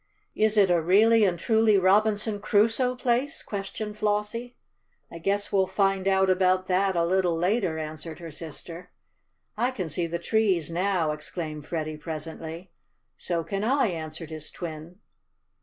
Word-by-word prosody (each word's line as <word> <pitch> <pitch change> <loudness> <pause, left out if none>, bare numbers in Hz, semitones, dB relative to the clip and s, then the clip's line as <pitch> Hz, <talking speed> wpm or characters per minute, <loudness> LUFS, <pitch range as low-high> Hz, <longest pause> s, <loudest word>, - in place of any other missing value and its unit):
"Is 215 0 +2
it 195 -3 +5
a 170 -1 +3
really 215 +6 +5
and 180 -3 +1
truly 220 +2 +3
Robinson 205 +2 +2
Crusoe 225 +5 +2
place?" 250 +2 -1
questioned 210 +1 -5
Flossie. 210 +4 -2 0.5
"I 170 - -8
guess 200 +4 -1
we'll 190 -1 +3
find 195 0 +1
out 190 0 +3
about 185 0 +2
that 190 +1 +1
a 170 -1 +2
little 180 -1 +1
later," 180 -1 0
answered 155 0 -6
her 165 -2 -9
sister. 165 +3 -8 0.7
"I 240 +3 +1
can 190 -10 -4
see 170 +3 -1
the 170 +1 -3
trees 185 -4 +1
now!" 175 -2 +1
exclaimed 150 0 -5
Freddie 155 -2 -3
presently. 160 +3 -7 0.4
"So 170 -2 -2
can 195 +5 -3
I," 260 0 +2
answered 160 -1 -6
his 155 -1 -7
twin. 165 +1 -8
185 Hz, 150 wpm, -26 LUFS, 165-210 Hz, 0.7 s, it